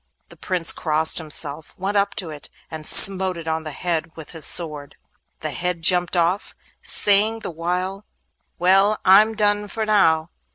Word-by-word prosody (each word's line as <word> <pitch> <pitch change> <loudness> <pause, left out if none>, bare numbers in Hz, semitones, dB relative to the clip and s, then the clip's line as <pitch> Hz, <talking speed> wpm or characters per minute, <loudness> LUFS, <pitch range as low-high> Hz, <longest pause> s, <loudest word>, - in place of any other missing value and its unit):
The - - -14
Prince 180 -3 0
crossed 160 +1 0
himself, 150 -1 -2
went 195 +2 -4
up 200 0 0
to 180 -7 -5
it, 150 -1 -11 0.2
and 155 -1 -7
smote 190 -2 +2
it 165 -1 -9
on 160 0 -3
the - - -4
head 165 +1 -3
with 160 -2 -10
his 160 -3 0
sword. 150 -4 0 0.5
The - - -4
head 180 -2 -4
jumped 180 0 +1
off, 175 +4 -1 0.3
saying 215 +3 +3
the - - -6
while, 180 +4 -4 0.5
'Well, 195 +4 +3
I'm 210 +4 +5
done 205 -1 0
for 220 +2 -4
now! 165 -6 +2
180 Hz, 165 wpm, -21 LUFS, 160-195 Hz, 0.5 s, I'm